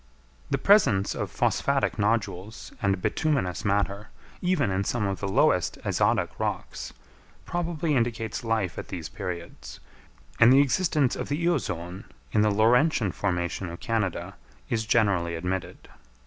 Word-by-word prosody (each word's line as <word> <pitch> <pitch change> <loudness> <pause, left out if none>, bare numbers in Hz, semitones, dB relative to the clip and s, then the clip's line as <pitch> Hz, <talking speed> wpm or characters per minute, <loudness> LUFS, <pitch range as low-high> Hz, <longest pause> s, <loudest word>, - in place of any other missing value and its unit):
The - - +1
presence 130 - +4
of - - -3
phosphatic 140 -4 0
nodules 105 -1 -1
and 100 -1 +1
bituminous 140 - 0
matter, 100 0 0 0.3
even 180 - +1
in 95 +1 0
some 105 +1 -1
of 100 -1 -2
the 100 - -3
lowest 95 - +2
azotic - - +1
rocks, - - -3 0.5
probably 165 -3 -1
indicates 115 -3 -1
life 110 -6 -1
at - - -7
these - - -6
periods; 85 -9 -7 0.6
and 115 +2 +8
the 135 - +7
existence 145 -1 +2
of - - -5
the 145 - 0
Eozoon 95 - -2 0.3
in 105 - +3
the 105 - +4
Laurentian 115 - +3
formation 90 0 -2
of 85 - -8
Canada 110 -6 -2 0.4
is 110 -2 -1
generally 100 -7 +2
admitted. 90 +2 -4
105 Hz, 135 wpm, -26 LUFS, 95-130 Hz, 0.6 s, and